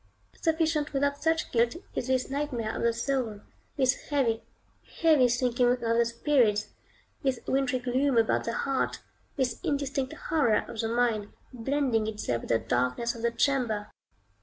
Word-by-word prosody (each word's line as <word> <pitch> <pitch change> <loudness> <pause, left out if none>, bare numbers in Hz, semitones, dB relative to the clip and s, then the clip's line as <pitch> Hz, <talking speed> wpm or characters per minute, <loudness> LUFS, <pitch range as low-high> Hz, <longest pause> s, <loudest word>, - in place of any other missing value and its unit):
Sufficient 320 -2 +1
without 285 +1 0
such 320 +1 +1
guilt 235 +2 +2 0.2
is 245 - -3
this 260 -1 +1
nightmare 270 -6 -2
of - - -3
the 235 - +3
soul; 230 -3 -2 0.4
this 260 -1 +1
heavy, 250 -6 +1 0.6
heavy 310 -6 +6
sinking 245 0 +2
of 250 - -3
the 230 0 +2
spirits; 235 -3 +2 0.5
this 265 -3 0
wintry 265 -1 +1
gloom 255 +1 +1
about 225 -1 +2
the 230 - -2
heart; 275 -1 -1 0.3
this 255 -4 -1
indistinct 275 -2 -1 0.2
horror 275 -10 +3
of 225 - -8
the 225 - 0
mind, 230 -3 +1 0.3
blending 250 -2 0
itself 210 - -2
with - - -10
the 115 - +4
darkness 125 - 0
of 230 - -9
the 235 - +2
chamber. 235 -4 0
250 Hz, 155 wpm, -28 LUFS, 230-275 Hz, 0.6 s, heavy